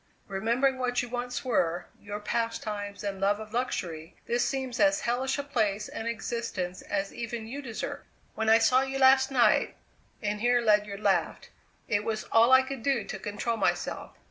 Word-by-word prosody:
Remembering 235 +7 +1
what 245 -1 0
you 245 - -7
once 245 +1 -4
were, 175 -8 +1
your 205 0 -6
pastimes 210 -2 -3
and 195 -2 -4
love 205 +1 +2
of 215 0 -9
luxury, 175 -9 -3
this 240 +1 +1
seems 265 -3 -2
as 295 0 +4
hellish 255 +3 0
a 285 - -2
place 215 -7 0
and 225 - -6
existence 230 -6 -3
as 195 -1 -3
even 230 -1 -5
you 270 +6 -6
deserve. 235 -5 -5 0.3
When 220 0 -1
I 225 - +8
saw 250 +3 +4
you 270 0 -2
last 265 0 +6
night" 255 -3 +3 0.4
and 210 -1 -2
here 245 +1 +4
Ledyard 210 -3 +2
laughed - - 0 0.4
"it 205 -1 +1
was 215 0 -2
all 230 +2 +5
I 260 0 +8
could 265 -1 -6
do 265 -3 +1
to 195 -1 -6
control 210 +3 -2
myself. - - -2
230 Hz, 175 wpm, -28 LUFS, 205-255 Hz, 0.4 s, I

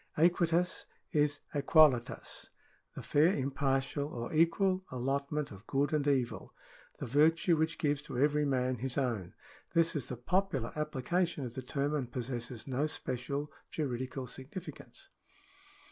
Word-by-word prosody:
Aequitas 170 +1 +2 0.2
is 145 -2 +2
aequalitas 140 -4 +3 0.2
— - - -37
the - - -6
fair 160 +6 +4
impartial, 135 +1 0
or 120 -3 -5
equal 185 +4 +3
allotment 140 +3 -2
of 100 +2 -12
good 140 +2 +1
and 145 -1 +1
evil 130 -4 0 0.2
— - - -25
the - - -4
virtue 160 - +4
which 160 +1 0
gives 145 -2 +1
to 130 - -7
every 150 +2 +3
man 130 -2 +1
his 125 +2 -3
own. 115 -10 -1 0.4
This 165 0 +4
is 145 - -2
the 125 - -5
popular 150 - 0
application 150 +1 -1
of 120 - -6
the 130 - -5
term, 140 +3 -1
and 130 -5 -2
possesses 120 -2 -4
no 135 +3 0
special 140 +1 -3 0.2
juridical 130 -2 -3
significance. 135 +9 -8
140 Hz, 145 wpm, -32 LUFS, 130-155 Hz, 0.4 s, fair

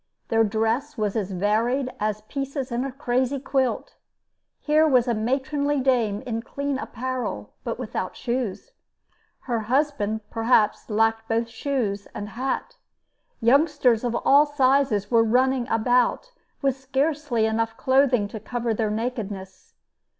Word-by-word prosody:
Their 225 0 +4
dress 225 +7 -1
was 210 -2 -1
as 205 -4 -1
varied 230 +8 0
as 215 0 -1
pieces 275 +3 -4
in 240 +2 -1
a 275 - -3
crazy 260 0 0
quilt. 265 -2 -1 0.6
Here 310 +1 +3
was 255 -4 +3
a 240 - +2
matronly 270 +5 0
dame 240 -6 +1
in 230 -2 -2
clean 280 +2 -3
apparel, 255 +1 -4
but - - -3
without - - -4
shoes; 245 - -3 0.7
her 235 -3 -2
husband 220 -3 0
perhaps 225 -2 +2
lacked 225 +1 +1
both 230 +1 0
shoes 230 -7 -2
and 205 0 -5
hat. 270 - -3 0.6
Youngsters 255 -2 +3
of 240 -1 -1
all 285 +2 +6
sizes 270 -7 +2
were 230 -1 +5
running 250 +2 +2
about 245 - +1 0.3
with 270 -1 +1
scarcely 270 -2 0
enough 225 0 -1
clothing 260 -5 +3
to 220 - -7
cover 235 +1 -2
their 220 0 0
nakedness. 210 -4 -5
245 Hz, 135 wpm, -24 LUFS, 220-270 Hz, 0.7 s, all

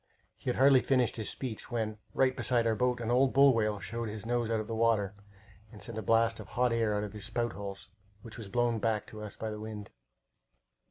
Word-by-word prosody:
He - - -5
had 125 - 0
hardly 135 -1 +6
finished 125 -4 +1
his 110 -3 -2
speech 125 -4 -5
when, 110 -3 -2 0.2
right 130 -1 +3
beside 120 0 +1
our 115 - +3
boat, 125 +2 +1
an 115 0 -1
old 130 +2 +3
bull 140 0 +7
whale 105 -3 0
showed 115 +4 -4
his 105 0 -7
nose 120 -1 0
out 115 -1 +1
of 110 - -3
the 115 - -5
water 110 -3 +2 0.6
and 105 - -12
sent 110 +3 -6
a - - -3
blast 115 0 +2
of - - -8
hot 125 -1 +1
air 115 -2 +1
out 105 - -1
of 105 - -6
his 105 -2 -5
spout 120 0 -2
holes, 100 -1 -7 0.3
which 115 - -10
was 115 -4 -8
blown 120 +1 +1
back 110 -1 0
to 110 - -10
us 105 -1 -7
by 110 -1 -4
the 105 - -6
wind. 105 -2 -7
115 Hz, 235 wpm, -31 LUFS, 105-120 Hz, 0.6 s, bull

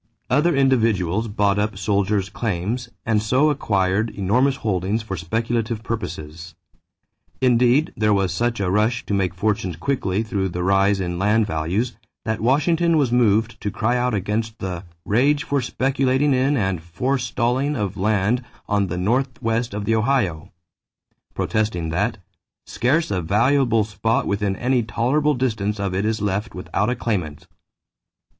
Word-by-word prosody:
Other 150 +5 +3
individuals 115 -7 +2
bought 100 -1 +1
up 105 -1 -1
soldiers' 100 0 0
claims 110 +3 -2 0.2
and 110 -2 +2
so 130 +8 +3
acquired 100 -5 0
enormous 120 +8 +1
holdings 105 -1 -1
for 100 -4 -4
speculative 115 +5 -2
purposes. 85 -7 -6 0.8
Indeed, 125 +4 +3
there 105 0 +2
was 95 -2 +2
such 120 -1 -1
a 95 -2 0
rush 110 +4 +1
to - - -3
make 95 -3 0
fortunes 95 -3 -1
quickly 100 +1 -1
through 100 -3 -2
the 90 0 -3
rise 100 +1 +3
in 90 -2 -3
land 105 +3 +3
values 100 +8 -2 0.3
that 110 -2 -2
Washington 160 +7 +2
was 135 -5 +2
moved 115 -1 +2
to 105 - -2
cry 120 +4 0
out 125 -2 0
against 110 +3 -2
the 90 -1 -5 0.2
"rage 140 +7 +2
for 140 -1 0
speculating 135 +2 +1
in 135 +3 +2
and 95 -6 -1
forestalling 125 - -1
of 100 -6 -2
land 105 +4 +1 0.2
on 100 -1 +1
the 90 0 -4
North 120 +7 0
West 115 +1 -1
of 100 +1 -4
the 115 - +1
Ohio," 110 - 0 0.8
protesting 105 -7 -1
that 100 +8 -1 0.5
"scarce 150 +5 0
a 95 -2 0
valuable 115 - +2
spot 105 +2 -1
within 100 -1 -1
any 125 +3 +1
tolerable 135 +7 +1
distance 110 -5 -1
of 100 -2 -2
it 95 +3 0
is 110 -1 -1
left 105 +3 -2
without 100 +3 -1
a 125 - 0
claimant." 90 -12 -3
110 Hz, 150 wpm, -22 LUFS, 95-125 Hz, 0.8 s, Other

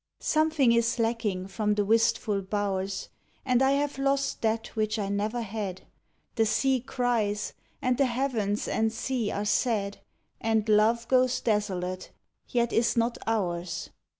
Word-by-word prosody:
Something 310 -5 +3
is 235 +1 +2
lacking 225 -5 -1
from 210 +1 0
the 205 -1 +1
wistful 225 -2 +2
bow 200 0 -1
rs, 190 0 -4 0.4
And 255 -1 +3
I 270 +1 +4
have 285 -1 -1
lost 275 0 0
that 225 0 0
which 215 0 0
I 200 -2 -2
never 215 +4 -1
had. 200 -3 -5 0.5
The 225 - +4
sea 265 +4 +2
cries, 230 -4 -1 0.3
and 250 0 +1
the 275 - +4
heavens 235 -5 -1
and 220 0 +1
sea 230 -1 -2
are 205 0 -2
sad, 210 -2 0 0.4
And 220 -1 +1
Love 220 +2 +3
goes 255 -1 +3
desolate, 185 -4 -1 0.4
yet 235 -2 0
is 235 +1 +2
not 235 +1 +1
ours. 180 -6 -2
225 Hz, 150 wpm, -28 LUFS, 205-245 Hz, 0.5 s, I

